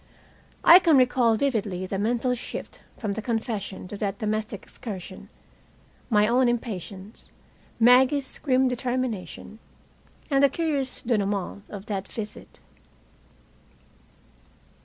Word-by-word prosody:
I 345 +2 +10
can 330 -6 +4
recall 250 -2 +4
vividly 210 -8 -1
the 190 +1 -3
mental 240 +4 +1
shift 245 - -7 0.2
from 210 -4 -3
the 220 - -4
confession 215 -4 -3
to 205 - -6
that 200 -1 -2
domestic 215 -2 -3
excursion, 190 -6 -8 0.8
my 210 -2 +4
own 245 +2 +3
impatience, 205 -3 -5 0.5
Maggie's 260 +4 +4
grim 260 -2 +2
determination, 245 -4 -3 0.7
and 275 0 +4
the 280 - +6
curious 285 -4 -2
denouement 200 -3 -1
of 200 -1 -8
that 200 -2 -4
visit. 215 -2 -8
225 Hz, 110 wpm, -25 LUFS, 205-255 Hz, 0.8 s, I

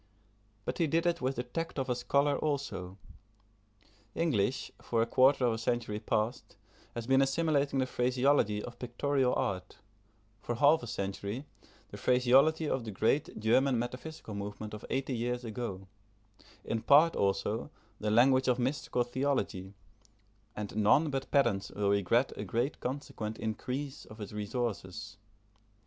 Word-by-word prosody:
But - - -3
he 165 - +3
did 165 +3 +1
it 170 -2 +1
with 130 +1 0
the 125 - -2
tact 165 +7 -4
of 135 - -1
a 125 - +1
scholar 140 +4 +1
also. 105 -12 -3 1.2
English, 135 -8 0
for 115 -1 +1
a - - 0
quarter 130 +2 +4
of 120 - +2
a - - -2
century 115 -2 -1
past, 110 +2 -2 0.4
has 120 -1 -4
been 135 +2 +4
assimilating 140 0 +1
the 130 - +2
phraseology 125 -4 +2
of 120 0 -9
pictorial 130 +2 0
art; 95 -1 -2 0.6
for 120 - -3
half 145 +6 +5
a 120 - -7
century, 100 +6 -4 0.4
the - - -9
phraseology 135 +6 +4
of 130 -4 -1
the 110 - -6
great 110 +8 0
German 125 +4 +3
metaphysical 125 +2 -5
movement 105 +1 -6
of 105 - -7
eighty 135 -1 -1
years 120 +1 -2
ago; 105 -4 -5 0.8
in 115 - -1
part 155 +6 +6
also 100 +5 0 0.3
the 105 - -1
language 130 +4 +4
of 125 -1 +3
mystical 125 -1 0
theology: 120 -7 -2 0.8
and 105 -1 -5
none 110 +9 +4
but 135 -1 -3
pedants 120 -9 +2
will 100 -1 0
regret 100 +6 +2
a - - -5
great 125 +5 -1
consequent 125 -5 -4
increase 130 +5 -4
of 110 - -13
its 105 - -6
resources. 110 -1 -4
125 Hz, 150 wpm, -31 LUFS, 105-135 Hz, 1.2 s, part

